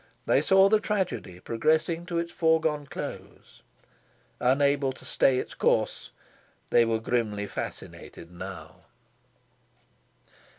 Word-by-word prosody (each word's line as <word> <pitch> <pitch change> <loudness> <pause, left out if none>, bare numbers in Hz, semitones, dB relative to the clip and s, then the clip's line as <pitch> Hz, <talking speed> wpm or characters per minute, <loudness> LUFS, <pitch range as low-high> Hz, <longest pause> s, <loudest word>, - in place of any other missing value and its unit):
They - - +3
saw 195 0 +5
the 215 +1 +4
tragedy 190 - -3
progressing 155 - 0
to 170 - -2
its 170 0 -2
foreseen 160 -3 +1
close. - - -9 0.8
Unable 140 +1 +2
to 130 - -13
stay 130 -1 +2
its - - -4
course, - - 0 0.6
they 120 - +5
were 115 0 +1
grimly 110 -3 -1
fascinated 90 -3 -8
now. 85 - -10
140 Hz, 110 wpm, -27 LUFS, 115-170 Hz, 0.8 s, saw